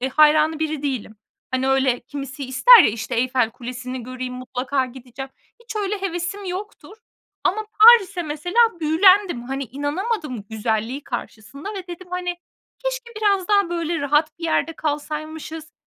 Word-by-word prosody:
eee, 260 - -1
hayranı 305 +2 +4
biri 310 -2 -2
değilim. 250 -6 -3 0.3
Hani, 260 +1 0
öyle 265 -2 +2
kimisi 275 +1 -7
ister 370 - +8
ya, - - +4
işte, 225 +1 -5
Eyfel 250 -1 +1
Kulesi'ni 250 +1 -7
göreyim, 255 +1 -6
mutlaka 255 +1 -2
gideceğim. 260 +1 -9 0.3
Hiç 450 -2 -8
öyle 410 -1 -2
hevesim 365 +2 -3
yoktur. 395 +3 -7 0.5
Ama 430 +3 0
Paris'e 405 -6 +7
mesela 310 +7 -4 0.2
büyülendim. 350 -2 +4
Hani, 270 +2 -4
inanamadım 290 - -3
güzelliği 225 +4 -2
karşısında 265 - -7
ve 375 -2 -6
dedim, 350 +1 -9
hani, 360 -1 -3 0.4
keşke - - -4
biraz 400 -3 +1
daha, 400 -3 +3
böyle, 335 -1 -2
rahat 300 +2 +1
bir 335 - -6
yerde 330 0 0
kalsaymışız. 310 +1 -5
300 Hz, 145 wpm, -22 LUFS, 255-365 Hz, 0.5 s, ister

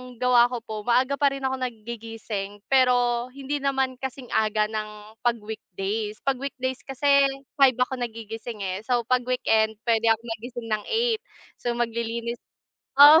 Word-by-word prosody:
gawa 245 0 +5
ko 245 -2 -5
po 220 - -6
maaga 260 +4 +3
pa 285 - +5
rin 275 - -6
ako 265 0 0
naggigising 225 -4 -5
pero 245 -2 +4
hindi 280 +1 -2
naman 265 -2 0
kasing 265 -1 -6
aga 215 -1 +2
ng 215 0 -6
pag 240 -1 +2
weekdays. 210 0 -4
Pag 270 -2 0
weekdays 260 -1 -3
kasi 280 +1 +4 0.3
5:00 265 -2 +6
ako 250 +1 0
nagigising, 225 -2 -5
eh, 190 0 -2
so 245 -2 +2
pag 250 +1 +1
weekend 220 -3 +2
puwede 230 -1 +2
akong 225 +1 +2
magising 240 0 -7
ng 215 -1 0
8:00 455 -1 +1 0.4
so 240 -1 -1
maglilinis 235 0 -2 0.6
o 295 +3 +10
240 Hz, 155 wpm, -25 LUFS, 220-260 Hz, 0.6 s, o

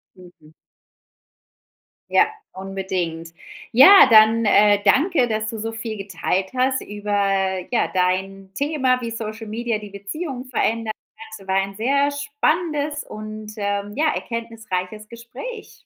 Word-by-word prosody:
Mhm. 170 -4 -18 1.6
Ja, 435 - +4 0.2
unbedingt. 185 -4 -4 0.4
Ja, 275 - +9
dann, 220 +1 +6
äh, 205 0 +5
danke, 295 -4 +3
dass 220 -1 -2
du 225 - -6
so 225 +1 -4
viel 225 -1 -6
geteilt 190 -1 -2
hast 260 +1 +1
über, 205 0 -7 0.6
ja, 240 - +1
dein 190 +1 -1
Thema, 270 -4 0
wie 235 - -4
Social 225 0 -6
Media 230 +1 -2
die 210 -1 -10
Beziehung 250 - -6
verändern. 230 -3 -1 0.5
Es 195 - -16
war 190 - 0
ein 195 0 -1
sehr 280 +6 +1
spannendes 295 +1 -1
und, 215 0 -8
ähm, 205 0 -3
ja, 310 +1 +1
erkenntnisreiches 220 -3 -5
Gespräch. 330 - -10
220 Hz, 125 wpm, -21 LUFS, 195-255 Hz, 1.6 s, Ja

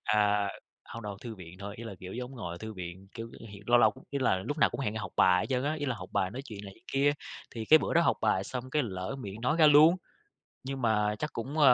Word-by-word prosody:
À, 105 -1 +3 0.4
hông 115 - -8
đâu, 100 -2 -6
thư 115 -2 -6
viện 90 -2 -11
thôi, 100 +1 -6
ý 115 - -7
là 115 - -6
kiểu 95 0 -7
giống 125 +1 -5
ngồi 90 -7 -5
ở - - -9
thư 110 +2 -6
viện. 90 0 -8
Kiểu, 115 0 -6 0.2
hẹn 100 0 -11
lâu 120 0 +6
lâu 110 -3 +5 0.2
ý 140 - -1
là 130 -7 +3
lúc 145 +11 -4
nào - - +5
cũng - - -5
hẹn 105 -5 -1
học 105 - -5
bài 90 0 +5
hết - - -3
trơn 130 +1 +1
á, 150 +2 +1
ý 145 -2 -3
là 130 - 0
học - - -8
bài 95 -2 +1
nói 130 +4 -6
chuyện 105 -5 -8
này 100 - -8
chuyện 115 - -25
kia. 140 +1 +4 0.4
Thì 115 - -4
cái 155 +7 +8
bữa - - -2
đó 170 - +6
học - - +3
bài 100 -3 +2
xong 130 +3 -5
cái 150 0 +2
lỡ 95 +4 -4
miệng 100 0 -7
nói 125 +6 +1
ra 155 - +8
luôn, 155 +4 +8 0.7
nhưng 135 0 -4
mà 105 -2 +2
chắc 150 - -3
cũng, 135 +7 -4
a 135 -4 +8
115 Hz, 285 wpm, -30 LUFS, 100-135 Hz, 0.7 s, cái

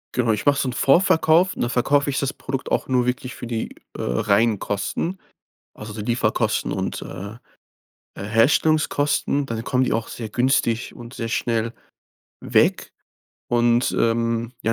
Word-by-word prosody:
Genau. 120 -3 +2
Ich 105 - -2
mache 145 -1 +4
so 130 - 0
'n - - -2
Vorverkauf, 165 +4 +4
und - - -3
da - - +1
verkaufe 140 +4 +2
ich 140 - -1
das 140 -1 -1
Produkt 135 -1 -5
auch - - 0
nur 125 -2 +2
wirklich 125 +1 -3
für 120 - -7
die, 115 -2 -4 0.2
äh, - - -4
reinen 105 - +2
Kosten, 165 - -3 0.6
also 105 0 -8
die 105 0 -6
Lieferkosten 120 +3 0
und, - - -3
äh, 100 +3 -7 0.9
Herstellungskosten. 145 +6 +2
Dann 115 -3 -4
kommen 130 +1 +1
die - - 0
auch 115 0 -1
sehr 115 -2 -6
günstig 125 -1 0
und 120 0 -10
sehr 115 -4 -4
schnell 115 -1 -1 0.7
weg. - - +2 0.6
Und, 120 +1 +3
ähm, 115 0 0
ja, 115 - +1
120 Hz, 160 wpm, -22 LUFS, 115-135 Hz, 0.9 s, mache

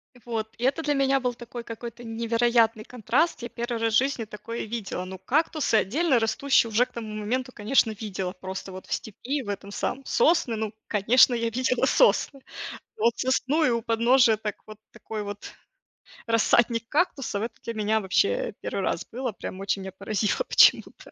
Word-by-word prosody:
И 245 - -17
вот, 225 -2 -3
и 235 - -7
это 270 +5 +2
для 295 - +1
меня 275 0 +2
был 250 -1 -1
такой 240 0 -8
какой-то 235 +1 -8
невероятный 230 -1 +1
контраст. 250 - 0
Я 240 - -5
1 235 +1 -4
раз 225 -1 +1
в - - +6
жизни 265 -3 0
такое 215 +2 -6
видела. 210 -5 -4
Ну, 190 0 -7
кактусы, 305 - +1
отдельно 260 - +2
растущие, 230 +2 +2
уже 240 +4 +4
к - - -24
тому 220 -2 -6
моменту, 250 +5 -2
конечно, 220 +2 +2
видела, 195 -4 -4
просто 190 0 -7
вот 185 0 -9
в - - -3
степи, 260 +7 -3
в 205 - -8
этом 200 0 -5
самом 265 +6 -3
Сосны, 310 -9 +2
ну, 215 -1 -3
конечно, 230 +5 +5
я 230 -1 0
видела 255 +2 +1
сосны. 295 - +3 0.6
Вот 230 +2 +2
сосну 260 +4 +1
и 295 - +4
у 235 -1 0
подножия 230 0 +4
так 210 -1 -4
вот, 215 -1 -10
такой 215 -1 -6
вот 205 0 -8 0.7
рассадник 230 0 +2
кактусов, 275 - 0
это 235 - -5
для 230 - -4
меня 215 0 +1
вообще 470 - +1
1 - - -3
раз - - -2
было, 250 0 -3
прям 190 -1 -7
очень 195 0 -1
меня 190 - -6
поразило 210 - -1
почему-то. - - +4
230 Hz, 180 wpm, -26 LUFS, 215-255 Hz, 0.7 s, в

